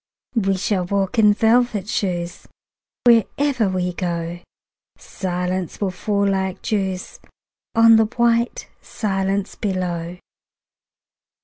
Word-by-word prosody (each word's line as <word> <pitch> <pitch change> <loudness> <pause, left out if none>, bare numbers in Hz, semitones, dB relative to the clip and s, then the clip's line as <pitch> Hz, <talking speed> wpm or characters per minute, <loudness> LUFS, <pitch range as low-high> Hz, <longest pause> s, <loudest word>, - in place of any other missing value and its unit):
We 195 -5 +1
shall 185 -1 0
walk 200 +5 -1
in 210 -1 +6
velvet 225 -2 +2
shoes: 175 -5 -3 0.6
Wherever 240 0 +3
we 180 -1 -1
go 170 -1 -3 0.6
Silence 180 -1 -4
will 200 -2 -1
fall 200 +2 0
like 190 -1 -1
dews 190 -3 -2 0.6
On 225 0 +7
white 235 +1 +1
silence 195 -1 -2
below. 180 -3 -3
195 Hz, 95 wpm, -21 LUFS, 180-220 Hz, 0.6 s, On